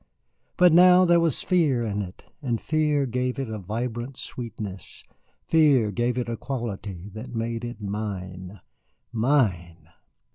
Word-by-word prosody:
But 180 -3 +6
now 180 +1 +7
there 170 -1 +5
was 165 -5 +1
fear 150 -10 +2
in 105 -2 -2
it, 90 -2 -9 0.2
and 120 -5 -1
fear 150 -3 +1
gave 125 +1 -2
it 135 -5 -3
a 110 - -4
vibrant 120 +6 -4
sweetness, 105 -5 -7 0.4
fear 140 -9 +4
gave 120 +4 -1
it 125 - -1
a 115 - -2
quality 105 -7 -5
that 110 +4 -8
made 115 +1 -2
it 120 0 -6
mine 100 -2 -5 0.5
mine. 95 - 0
115 Hz, 140 wpm, -25 LUFS, 105-135 Hz, 0.5 s, now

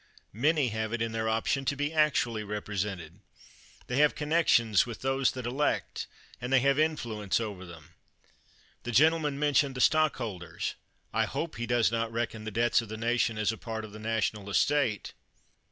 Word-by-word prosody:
Many 145 - +2
have 110 0 -3
it 120 - -2
in 115 - -2
their 110 0 -1
option 115 +5 0
to 140 - 0
be 145 +2 -2
actually 130 -8 +2
represented. 100 -4 -4 0.7
They 125 - -3
have 150 0 +4
connections 150 -9 +3
with 115 -3 -7
those 135 0 +1
that 130 -2 -6
elect, 135 +5 -1 0.3
and 125 +1 -4
they 135 - +6
have 140 +2 +3
influence 115 -11 0
over 100 -5 -5
them. 85 -1 -13 0.9
The 120 - -5
gentleman 150 +3 +3
mentioned 145 -2 +2
the - - -5
stockholders. 125 - 0 0.4
I - - +2
hope 165 -6 -4
he 120 0 -3
does 120 -3 +2
not 115 0 -1
reckon 115 -1 -3
the - - -3
debts 120 +2 +2
of 115 - -10
the 110 - -5
nation 115 0 0
as 110 0 +1
a 110 - -8
part 110 -1 -5
of 105 - -12
the 110 - -10
national 110 -2 -2
estate. 120 0 +1
115 Hz, 175 wpm, -29 LUFS, 110-140 Hz, 0.9 s, they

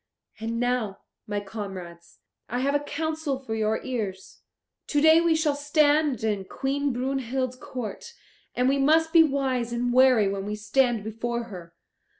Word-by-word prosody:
And 230 +1 -3
now, 245 -5 -1 0.3
my 205 -1 -2
comrades, 195 -5 -8 0.3
I 245 +2 -1
have 280 +2 +1
a 290 - +3
counsel 310 -1 -3
for 260 -4 -6
your 220 0 0
ears. 210 -7 -5 0.5
To 290 - +1
day 315 +2 +6
we 335 -1 +3
shall 315 -2 +1
stand 290 -3 +2
in 205 -3 -1
Queen 275 +6 -1
Brunhild's 255 0 -2
court, 255 - -7 0.4
and 250 +1 +2
we 275 +1 +2
must 320 +3 +3
be 335 - +8
wise 265 -5 0
and 240 +1 -1
wary 255 -5 +5
when 195 0 -3
we 210 - -2
stand 220 +1 +1
before 235 +2 -3
her. 175 -6 -11
250 Hz, 155 wpm, -26 LUFS, 215-285 Hz, 0.5 s, be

